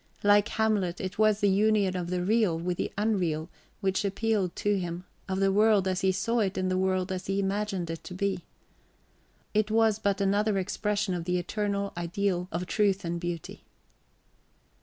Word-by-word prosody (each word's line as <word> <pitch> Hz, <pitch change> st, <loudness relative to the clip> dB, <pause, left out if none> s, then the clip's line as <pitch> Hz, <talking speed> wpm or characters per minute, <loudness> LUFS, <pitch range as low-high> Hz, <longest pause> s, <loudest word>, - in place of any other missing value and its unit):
Like 205 Hz, 0 st, +5 dB
Hamlet, 205 Hz, -5 st, 0 dB
it 190 Hz, +2 st, -5 dB
was 215 Hz, -1 st, +3 dB
the 205 Hz, -, +4 dB
union 200 Hz, -1 st, +3 dB
of 175 Hz, -1 st, -3 dB
the 180 Hz, 0 st, -1 dB
real 210 Hz, -4 st, +2 dB
with 175 Hz, +1 st, -2 dB
the -, -, -2 dB
unreal 180 Hz, -7 st, 0 dB, 0.3 s
which 195 Hz, 0 st, 0 dB
appealed 200 Hz, -2 st, 0 dB
to 205 Hz, -1 st, +1 dB
him, 175 Hz, 0 st, -4 dB, 0.3 s
of 190 Hz, 0 st, -1 dB
the 195 Hz, 0 st, +3 dB
world 210 Hz, -1 st, +4 dB
as 185 Hz, 0 st, 0 dB
he 190 Hz, -, +3 dB
saw 230 Hz, +6 st, 0 dB
it 195 Hz, -3 st, 0 dB
and 185 Hz, 0 st, 0 dB
the 185 Hz, -, +1 dB
world 185 Hz, 0 st, 0 dB
as 185 Hz, 0 st, -4 dB
he 195 Hz, +1 st, 0 dB
imagined 195 Hz, -2 st, -1 dB
it 165 Hz, -, -7 dB
to 180 Hz, -, -7 dB
be. 190 Hz, -2 st, -1 dB, 1.1 s
It 215 Hz, 0 st, +2 dB
was 220 Hz, -1 st, +3 dB
but 200 Hz, -2 st, 0 dB
another 200 Hz, +1 st, +2 dB
expression 205 Hz, +1 st, -1 dB
of 175 Hz, -2 st, -3 dB
the 180 Hz, 0 st, +1 dB
eternal 200 Hz, +2 st, -2 dB
ideal 180 Hz, +1 st, -1 dB
of 175 Hz, +2 st, -2 dB
truth 200 Hz, -1 st, +1 dB
and 170 Hz, 0 st, -2 dB
beauty. 175 Hz, -2 st, -5 dB
195 Hz, 180 wpm, -28 LUFS, 180-210 Hz, 1.1 s, Like